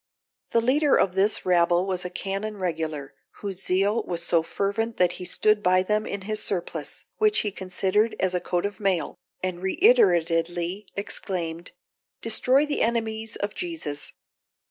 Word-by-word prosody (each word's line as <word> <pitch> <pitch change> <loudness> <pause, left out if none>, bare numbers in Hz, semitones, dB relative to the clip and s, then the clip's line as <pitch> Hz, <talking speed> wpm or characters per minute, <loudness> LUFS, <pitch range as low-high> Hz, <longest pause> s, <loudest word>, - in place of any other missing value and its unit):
The 230 - +2
leader 280 +5 +3
of 185 - +2
this 195 +3 +2
rabble 175 0 +3
was 185 -2 -2
a 180 - -4
canon 195 +4 -4
regular, 160 -6 -3 0.2
whose 195 -2 -6
zeal 195 +5 +1
was 170 -1 -3
so 170 -1 +3
fervent 205 +6 -2
that 180 -1 +3
he - - -5
stood 215 +3 +2
by 185 -1 +3
them 210 +2 0
in 200 - -4
his 215 +2 -3
surplice, 180 -3 -3
which 430 -1 +3
he 210 - -1
considered 195 +3 0
as 185 -1 +1
a 180 - +1
coat 175 +1 -1
of 205 -1 -4
mail, 185 -4 0 0.2
and 185 -2 -2
reiteratedly 175 - +2
exclaimed, 175 -4 -3 0.5
"Destroy 255 +5 +3
the 295 -1 -1
enemies 225 -1 -1
of 205 0 -3
Jesus!" 320 - -4
195 Hz, 155 wpm, -25 LUFS, 175-215 Hz, 0.5 s, leader